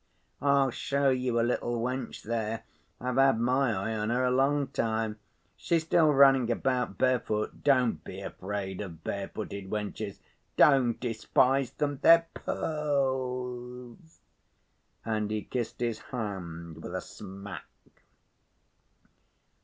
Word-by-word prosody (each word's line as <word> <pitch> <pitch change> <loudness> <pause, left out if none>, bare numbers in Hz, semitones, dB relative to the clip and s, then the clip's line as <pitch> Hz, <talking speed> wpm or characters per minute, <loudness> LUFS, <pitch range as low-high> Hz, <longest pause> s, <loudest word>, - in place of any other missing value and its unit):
I'll 140 -2 +3
show 140 +2 +1
you 125 -2 0
a - - +3
little 120 -1 -1
wench 125 +1 -3
there. 110 0 -2 0.4
I've 125 +1 -2
had 135 -4 +5
my 125 +2 +2
eye 110 +2 -2
on 105 0 -1
her 125 +2 +1
a 125 - +2
long 135 +2 +2
time. 110 -3 -1 0.4
She's 165 -2 0
still 160 -1 +4
running 135 -3 +6
about 125 -4 0
bare‐foot. 120 -4 0
Don't 125 - +3
be - - -8
afraid 95 -1 -5
of 85 -5 -8
bare‐footed 100 0 -5
wenches—don't 110 +5 +1
despise 125 +2 +2
them—they're 150 +4 +4
pearls!" 130 -2 -3 0.8
And 110 -2 -1
he 105 -1 -2
kissed 120 -3 -4
his 115 -2 -1
hand 85 - -5
with 90 - -6
a 95 - -2
smack. 100 +1 -9
120 Hz, 115 wpm, -29 LUFS, 105-135 Hz, 0.8 s, running